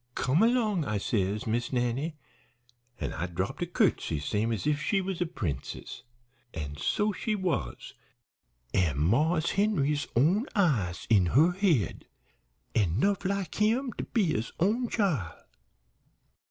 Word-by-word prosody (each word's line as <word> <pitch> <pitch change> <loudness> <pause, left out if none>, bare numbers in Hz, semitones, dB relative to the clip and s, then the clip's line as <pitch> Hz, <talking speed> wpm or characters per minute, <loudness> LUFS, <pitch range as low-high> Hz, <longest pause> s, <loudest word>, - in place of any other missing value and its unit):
"'Come 135 +6 +1
long,' 220 -5 +3
I 105 -7 -1
says, 100 0 -1
'Miss 120 +2 -1
Nannie,' 130 +5 -1 0.8
an' - - -3
I 85 +3 -3
dropped 90 +2 -3
a - - 0
curtsey - - +1
same's 105 - -1
if 150 -1 +1
she 200 +4 +1
was 190 -2 -3
a 175 - +1
princess. 85 - -5 0.5
An' 75 -3 -5
so 210 - 0
she 215 +2 -2
was, 165 - -3 0.8
an' 85 -8 +2
Marse 150 - +2
Henry's 150 -9 +1
own 180 - +3
eyes 120 - +1
in 95 -5 +5
her 155 - +5
head, 175 - 0 0.7
an' 95 -3 +1
'nough 200 +5 +1
like 195 -3 -1
him 235 +4 +2
to - - -5
be 225 -5 +1
his 110 +3 -2
own 225 +7 +1
chile. 145 - 0
145 Hz, 140 wpm, -29 LUFS, -, 0.8 s, in